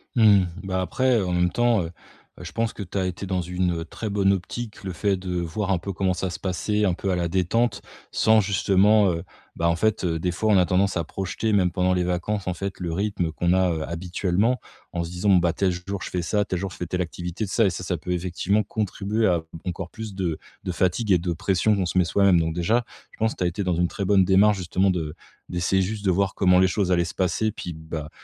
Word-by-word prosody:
Mmh, 105 -5 +6 0.2
bah, 95 -1 -1
après, 130 +7 +1
heu, 100 - -1
en 90 - -2
même 90 0 +2
temps, 120 -4 +2
heu 80 - -6 0.5
heu, - - -9
je - - -7
pense 115 0 -1
que 105 - -6
tu 95 +1 -6
as 95 - +1
été 90 +2 -5
dans 95 -1 -1
une 90 -1 -1
très 110 - -5
bonne 100 -1 +2
optique, 105 +4 -5
le 95 - -4
fait 100 +3 +1
de 90 -1 -3
voir 90 +4 -2
un 95 - +3
peu 95 +3 -5
comment 95 0 0
ça 95 0 -2
se - - -6
passait 105 +3 -1
un 90 - +2
peu 95 +1 -2
à - - +1
la 85 -1 0
détente 95 +7 +1 0.3
sans 110 0 +4
justement, 100 +1 +4
heu, 85 0 -3 0.3
bah, 85 - +1
en 85 - +2
fait, 110 +3 +1
heu, 80 -1 0
des 90 +2 0
fois, 110 +5 0
on - - +6
a 90 - +5
tendance 95 +3 +1
à 85 - 0
projeter 95 +5 -3
même 90 -3 +3
pendant 90 0 +1
les 90 - +1
vacances 90 +3 -2
en 90 - 0
fait, 95 +1 -5
le 85 -2 -3
rythme 95 -4 -1
qu'on 85 +2 +1
a, 95 -1 +3
heu, 80 -2 -2
habituellement 90 +7 0 0.3
en 85 - -1
se - - -7
disant: 90 +4 -1
«Bon, 95 - +7
bah, 85 -1 +2
tel 95 0 +1
jour 90 +2 -5
je - - -5
fais 90 - -2
ça, 105 +5 +1
tel 90 -3 -3
jour 95 0 -4
je - - -10
fais 90 - -3
telle 90 +2 -2
activité 90 +4 -4
tout 95 - -8
ça» 115 - +4
et - - +4
ça, 90 +1 -5
ça 90 0 -1
peut 90 +3 -6
effectivement 90 +4 0
contribuer 105 +1 -1
à 85 -3 +2 0.2
encore 90 0 -4
plus 110 0 -7
de 85 -5 -1 0.3
de 90 - -2
fatigue 95 +5 0
et 90 - +6
de 85 +1 -2
pression 95 +5 +1
qu'on 95 -2 0
se 95 - -2
met 90 - +6
soi-même. 95 0 +4
Donc 80 0 0
déjà, 100 +9 +1 0.3
je - - -18
pense 110 0 +1
que - - -19
tu - - +1
as - - +3
été 95 +4 -2
dans 90 -2 0
une 85 +1 +2
très 100 - -5
bonne 95 -1 +4
démarche 100 +2 +4
justement 95 +1 +1
de 80 -4 -2 0.3
d'essayer 90 +2 +1
juste 100 +2 -3
de 95 - +4
voir 100 +2 +1
comment 90 -1 +4
les 95 - +5
choses 95 0 0
allaient 85 - +3
se - - -6
passer 100 +4 0
puis 90 -4 -6
bah, 80 -1 -6
95 Hz, 265 wpm, -24 LUFS, 90-100 Hz, 0.5 s, Bon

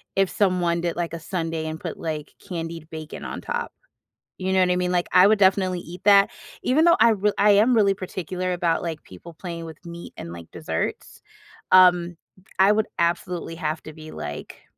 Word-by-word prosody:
if 195 -1 +2
someone 180 -4 +1
did, 170 -1 -2
like, 170 -1 -3
a 165 - -4
sundae 165 -1 -3
and 155 0 -4
put, - - -6
like, 155 -2 -5
candied 165 -2 -6
bacon 155 -1 -8
on - - -6
top. - - -4 0.6
You 190 0 -2
know 190 - +4
what 180 -1 +3
I 180 - +1
mean? 180 0 0
Like, 175 -1 0
I 185 +2 +7
would 215 +1 +4
definitely 190 -2 +3
eat 175 +2 -10
that. 200 -1 +6 0.3
Even 300 +6 +3
though 340 0 +6
I 230 0 +7
r 210 - -1 0.2
I 210 - +4
am 225 +5 +4
really 200 -3 +4
particular 185 -1 -4
about, 170 -2 0
like, 165 -3 -5
people 95 - -13
playing 170 0 -7
with 160 +2 -12
meat 170 0 -9
and, 85 - -7
like, 85 -1 -10
desserts. - - -4 0.5
Um, 175 -2 +6 0.4
I 195 +2 +6
would 215 +1 +1
absolutely 170 0 -1
have 155 -1 -3
to 155 - -9
be, 155 0 -11
like 75 - -8
175 Hz, 200 wpm, -24 LUFS, 165-190 Hz, 0.6 s, I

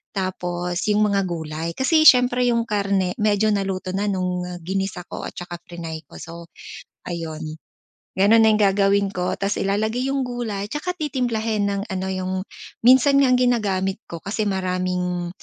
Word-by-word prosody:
tapos 180 -2 -2
yung 210 0 +3
mga 200 0 +2
gulay. 160 -1 -4
Kasi 310 +4 +3
siyempre 250 0 +5
yung 235 -1 +2
karne 195 -3 0
medyo 210 0 +2
naluto 195 -2 -2
na 200 +2 -1
nung 180 -2 -1 0.2
ginisa 190 0 -3
ko - - -5
at - - -10
tsaka 175 -1 -7
friny 165 -2 -7
ko, - - -16
so 170 0 -9 0.6
ayun. 160 -2 -5 0.6
Gano'n 210 +4 +5
na 220 - +6
yung - - +3
gagawin 200 0 +3
ko 180 0 -2
tapos 200 +1 -1
ilalagay 220 +6 0
yung 275 0 0
gulay 235 -5 -3
'tsaka 305 +7 -3
titimplahin 230 - -1
ng 200 0 -2
ano 190 0 -3
yung 185 0 -3 0.5
minsan 260 +3 +6
nga 270 - +4
ang 250 - +4
ginagamit 205 -5 +1
ko 170 - -5
kasi 205 +3 -3
maraming 180 -2 -1
195 Hz, 160 wpm, -22 LUFS, 180-220 Hz, 0.6 s, na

